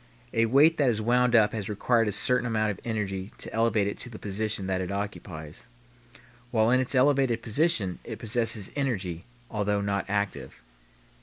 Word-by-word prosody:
A 115 0 +3
weight 145 +7 +5
that 140 -4 +3
is 110 -3 0
wound 125 +2 +2
up 110 -2 +5
has 110 -3 -4
required 115 +2 +1
a - - 0
certain 125 +4 +1
amount 110 -2 +1
of 100 - -8
energy 100 -4 -3
to - - -9
elevate 115 -2 +2
it 100 - -4
to 120 - -4
the 110 - -9
position 105 0 -3
that 95 -1 -1
it 90 +1 -4
occupies. 90 -6 -6 0.8
While 110 -1 +2
in 130 - +4
its 130 +1 0
elevated 130 -3 +3
position 115 - 0
it 115 - -7
possesses 115 -3 0
energy, 95 - -2 0.3
although 105 -1 0
not 100 -1 -1
active. 100 -9 -3
110 Hz, 175 wpm, -27 LUFS, 100-120 Hz, 0.8 s, weight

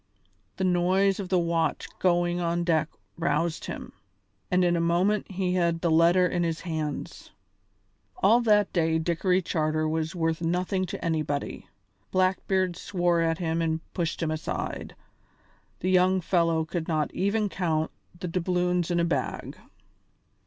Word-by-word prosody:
The 190 - -1
noise 185 +2 +2
of 190 -3 -4
the 185 - +3
watch 170 -2 0
going 175 -1 +2
on 170 0 0
deck 160 -2 +1 0.3
roused 165 0 0
him, - - -7 0.6
and 180 0 +3
in 175 0 +3
a 170 - +1
moment 180 +5 +1
he 185 -1 -1
had 170 -2 +1
the 170 - +1
letter 170 +3 +5
in 180 -1 0
his 165 -1 -1
hands. 155 -4 -4 0.9
All 240 -9 +4
that 210 -3 +3
day 160 -2 +2
Dickory 180 +3 +1
Charter 155 -2 0
was 160 +2 -2
worth 165 -1 -1
nothing 180 +3 0
to - - -6
anybody. 155 -3 -2 0.4
Blackbeard 185 -1 +1
swore 175 -3 0
at 165 0 +1
him 165 -1 -1
and 160 -1 0
pushed 170 -1 -2
him 155 - 0
aside. 155 - -4 0.9
The 185 - 0
young 185 +1 +4
fellow 165 -2 +1
could 160 +1 -4
not 155 -2 -1
even 205 +3 +1
count 160 -5 -1 0.3
the 180 - -4
doubloons 180 0 0
in 175 -1 +1
a 170 - +2
bag. 145 -6 -2
175 Hz, 150 wpm, -27 LUFS, 165-185 Hz, 0.9 s, letter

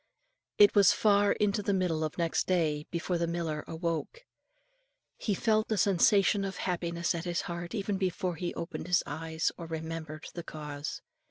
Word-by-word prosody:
It 205 0 +7
was 200 -3 +6
far 205 -1 +4
into 210 0 +1
the 200 -1 0
middle 170 -4 0
of 155 - -3
next 170 -2 0
day, 155 -5 +1
before 170 +1 -2
the 170 - 0
miller 165 -3 -2
awoke. 170 - -3 1.0
He 205 - -1
felt 215 +1 +1
a 215 - +2
sensation 200 +1 +4
of 195 -1 -4
happiness 170 -1 -1
at 170 0 -4
his 175 -1 -1
heart 170 +3 -5
even 200 -1 -1
before 185 -1 -1
he 175 +2 -3
opened 170 0 -5
his 180 -2 +3
eyes, 160 +2 -2
or 170 - -6
remembered 160 -1 -5
the 175 - -5
cause. 150 -2 -6
170 Hz, 170 wpm, -30 LUFS, 160-195 Hz, 1.0 s, It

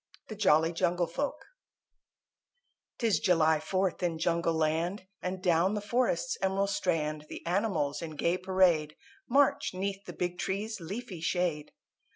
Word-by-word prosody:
THE 215 - -5
JOLLY 165 -5 +3
JUNGLE 175 +1 +1
FOLK 285 +10 -4 1.5
'Tis 225 -4 +2
July 160 -3 +3
Fourth 185 +3 -1
in 170 -2 0
Jungle 165 0 +1
Land, 165 +5 0 0.2
And 185 0 -4
down 180 +3 +3
the - - 0
Forest's 235 0 0
Emerald 195 +1 +1
Strand 155 -5 -1
The - - -8
animals 170 -6 0
in 160 -2 -6
gay 170 +4 0
parade 180 -5 +2 0.3
March 275 -6 +3
'neath 195 +1 -3
the - - -7
big 180 0 -3
trees' 210 +3 -2
leafy 195 +2 -6
shade. 170 -3 -1
180 Hz, 140 wpm, -30 LUFS, 165-195 Hz, 1.5 s, JOLLY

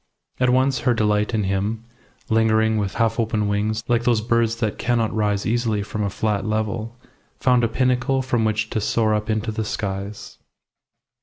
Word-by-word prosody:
And 125 0 +3
at - - +3
once 130 0 +2
her 125 - +1
delight 105 0 +1
in 105 - +1
him, 100 +4 -1 0.4
lingering 110 -1 +2
with 100 -2 -3
half 115 0 +1
open 110 -2 0
wings 105 +2 -1
like 120 -1 +2
those 120 -2 +3
birds 115 0 +1
that 110 -3 -2
cannot 120 -3 0
rise 105 -2 0
easily 110 -2 0
from 105 +1 -4
a 100 - 0
flat 105 0 -1
level, 110 +2 -2 0.4
found 125 -2 +3
a - - +4
pinnacle 130 +2 +1
from 120 -3 0
which 110 0 0
to 110 - -1
soar 110 +1 +1
up 105 +1 -2
into 110 +1 -1
the 110 +1 -2
skies. 100 -1 -5
110 Hz, 180 wpm, -22 LUFS, 105-115 Hz, 0.4 s, a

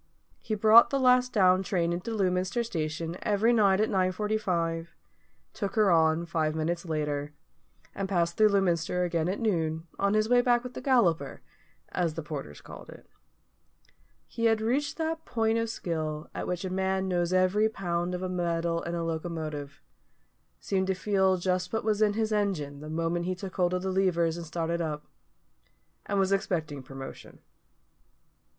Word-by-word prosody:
He 215 - -3
brought 220 +3 +7
the 275 - 0
last 250 -1 +4
down 185 -4 +4
train 175 -3 0
into 175 +6 -4
Lewminster 185 +3 0
station 165 -4 -3
every 215 +3 +2
night 200 -4 +4
at 215 - +3
9.45, 185 -4 -1 0.7
took 200 -2 -4
her 210 -4 +4
on 160 0 +3
five 160 -2 -1
minutes 170 +3 -2
later, 150 -2 -2 0.6
and 195 -1 -4
passed 170 -3 +1
through 215 -1 +5
Lewminster 180 -3 +1
again 170 -1 -1
at 195 - -2
noon, 160 -7 -1
on 200 +1 +2
his 215 0 +2
way 245 +1 +5
back 245 -1 +2
with 250 0 -7
the - - -7
Galloper, 180 - +1 0.5
as 170 -4 -1
the 165 - -5
porters 140 - -7
called - - -11
it. - - -13 1.2
He 230 - -3
had 225 -1 +4
reached 260 +7 -1
that 320 0 -2
point 225 -1 0
of 230 0 -1
skill 155 -6 -4
at - - -4
which 180 +1 -3
a 185 - -4
man 190 0 0
knows 175 -1 0
every 185 +4 +3
pound 175 -3 -2
of 185 0 -3
metal 170 -1 -1
in 170 0 -4
a 170 - -2
locomotive; 155 -3 -5 0.8
seemed 190 -1 -1
to 190 - +1
feel 190 -1 +2
just 180 0 -1
what 220 - -1
was 215 -1 0
in 210 -1 +4
his 220 0 -1
engine 180 -10 -1
the 155 +1 -8
moment 165 +2 -1
he 185 0 -1
took 185 0 -8
hold 180 -1 +2
of 180 - -3
the 190 - -1
levers 175 -4 +1
and 170 -1 -7
started 170 +1 -2
up; 150 -2 -4 1.0
and 200 - -1
was 195 0 +2
expecting 160 -7 -1
promotion. 135 0 -10
180 Hz, 170 wpm, -28 LUFS, 165-210 Hz, 1.2 s, brought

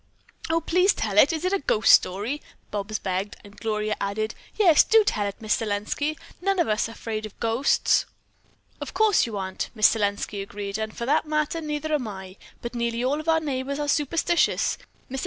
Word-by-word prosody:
"Oh, 330 +1 +2
please 360 +4 +3
tell 205 -2 +1
it! 275 - +6
Is 325 +2 -3
it 370 - +1
a 395 - +2
ghost 220 -5 +3
story?" 210 +11 +3 0.3
Bobs 210 +1 -3
begged, 190 +2 -3
and 205 0 -15
Gloria 215 -1 -2
added, 215 +2 -2 0.2
"Yes, 350 -8 +6
do 445 -1 +5
tell 210 - 0
it, 200 - -7
Miss 215 -2 +1
Selenski. 210 +6 -2
We 310 - -1
are - - -18 0.3
none 390 0 +2
of 345 - +2
us 215 +1 +1
afraid 220 -1 -5
of 210 - -20
ghosts." 230 +4 +2 0.7
"Of - - -6
course 435 - +4
you 215 -3 -5
aren't," 190 -1 -4
Miss 215 -1 +6
Selenski 205 -1 -2
agreed, 200 +1 -5
"and, 220 0 -5
for 235 - -3
that 300 +4 +1
matter, 305 +2 -1
neither 305 0 -3
am 270 -6 0
I. 190 -2 -8 0.3
But 235 0 -5
nearly 235 0 -1
all 275 +4 +1
of 310 +1 -4
our 320 0 +4
neighbors 280 -2 -3
are 295 0 -2
superstitious. 320 +4 +1 0.3
Mr. 265 0 -4
235 Hz, 200 wpm, -25 LUFS, 210-305 Hz, 0.7 s, it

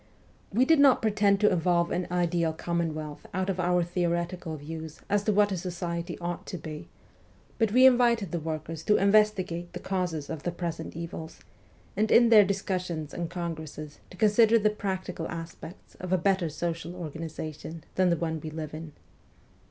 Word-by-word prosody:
We 240 +6 +3
did 320 +1 +5
not 275 -4 +6
pretend 205 -2 +3
to 210 - +5
evolve 170 0 +2
an 180 - -1
ideal 175 -2 +1
commonwealth 160 -3 -3
out 185 +1 0
of 185 - -5
our 180 0 +2
theoretical 170 -1 -2
views 160 +1 -8
as 205 0 +2
to 215 - +3
what 205 0 +3
a 190 - -1
society 175 -1 -4
ought 175 0 -5
to 180 - -5
be, 155 -1 -8 0.7
but 225 -3 +2
we 255 +3 +6
invited 240 -6 +4
the 170 - -1
workers 155 0 -5
to 210 - +4
investigate 195 -4 +2
the 180 - -5
causes 180 -6 -2
of 160 -3 -5
the 175 - -2
present 170 -2 -5
evils, 165 -1 -7 0.5
and 215 +2 +1
in 235 0 +6
their 215 -3 +8
discussions 185 -5 -2
and 170 -1 -3
congresses 160 -4 -6
to 185 - -13
consider 220 +3 +5
the 215 -1 +2
practical 190 -5 -4
aspects 165 +1 -9
of 185 0 -6
a 185 - +4
better 185 -1 +1
social 165 +2 -4
organi 165 -2 -6
zation 155 +1 -7
than 185 -1 +3
the 170 - +2
one 160 -1 -2
we 155 - -5
live 155 -1 -6
in. 155 -1 -8
175 Hz, 175 wpm, -28 LUFS, 160-195 Hz, 0.7 s, their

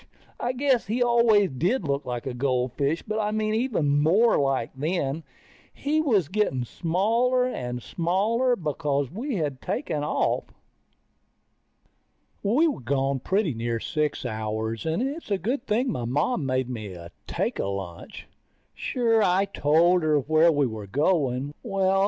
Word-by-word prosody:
I 245 +1 -1
guess 260 -3 +1
he 240 +4 +1
always 235 -5 +4
did 180 - 0
look 140 -1 -1
like 120 -1 -4
a 130 - -3
goldfish, 130 +4 0
but 215 +1 -3
I 210 -1 0
mean 215 0 0
even 180 - +1
more 205 +10 +4
like, 135 -4 0
then. 155 +7 -1
And 150 +5 -4 0.5
he 305 +2 0
was 215 - +2
getting 175 -10 0
smaller 225 - +1
and 125 - -4
smaller, 215 +9 +1
because 145 - -1
we 240 - -3
had 145 -7 -2
taken 150 -1 -2
off. 150 - 0 2.0
We 250 +12 +3
were 290 - -2
gone 135 +2 0
pretty 190 - 0
near 115 0 -2
six 150 +2 -2
hours, 110 +1 -3
and 165 +9 0
it's 285 +2 -4
a 200 - +1
good 240 - -3
thing 240 +4 +1
my 120 - -3
Mom 145 - 0
made 130 -1 0
me 110 -7 -6 0.3
take - - -2
a - - -1
lunch. 95 -4 -6 0.5
Sure, 230 -3 +1
I 190 0 +3
told 175 0 +3
her 155 -1 +3
where 155 +4 +4
we 145 -2 +2
were 110 -4 -5
going. 140 - 0
Well 195 -4 +1
160 Hz, 150 wpm, -26 LUFS, 130-220 Hz, 2.0 s, always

